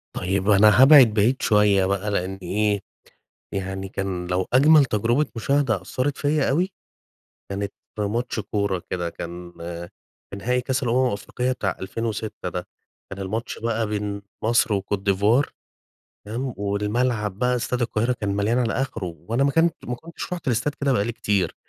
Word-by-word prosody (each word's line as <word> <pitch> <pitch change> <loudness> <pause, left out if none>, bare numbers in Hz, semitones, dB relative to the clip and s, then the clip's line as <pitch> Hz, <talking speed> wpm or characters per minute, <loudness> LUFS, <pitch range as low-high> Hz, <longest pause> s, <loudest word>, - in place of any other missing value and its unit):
طيب 95 +2 -1
أنا 105 +4 +6
هابعد 135 -6 +8
بعيد 115 +5 +2
شوية 105 -3 +4
بقى؛ 100 +1 -1
لأن 95 0 -2
إيه 105 +3 0 0.7
يعني 95 0 -4
كان 95 -3 -3
لو 90 +1 0
أجمل 145 +2 +7
تجربة 120 +6 +1
مشاهدة 120 -4 +1
أثّرت 130 +9 -2
فيَّ 145 0 +1
أوي، 180 +7 +1 0.8
كانت 100 0 -3 0.3
في - - +1
ماتش 120 +2 -2
كورة 100 -3 -1
كده، 90 -2 -2
كان 85 +1 -8 0.8
في - - -5
نهائي 125 +5 0
كاس 130 +1 -1
الأمم 125 +2 +2
الأفريقية 125 +3 -2
بتاع 100 -8 -2
2006 110 -1 -4
ده، 90 0 -5 0.4
كان 100 0 -6
الماتش 110 +5 -4
بقى 115 -1 -1
بين 105 -1 -3 0.2
مصر 115 +1 +3
وكوت 100 0 -1
ديفوار، 105 +7 +2 0.8
تمام؟ 125 +4 -3
والملعب 105 +1 -1
بقى 125 0 +2
استاد 125 +1 -2
القاهرة 120 +1 +1
كان 100 -4 -3
مليان 105 +4 +1
على 120 -2 0
آخره، 130 -7 -2 0.2
وأنا 120 +4 +2
ما 140 - +3
كان 165 +3 +4
ما 125 - -3
كنتش 165 +6 -7
رُحت 175 -5 -7
الاستاد 125 +4 +1
كده 140 -1 +2
بقى 100 - +2
لي 120 - -1
كتير، 100 -6 0
110 Hz, 160 wpm, -23 LUFS, 100-125 Hz, 0.8 s, هابعد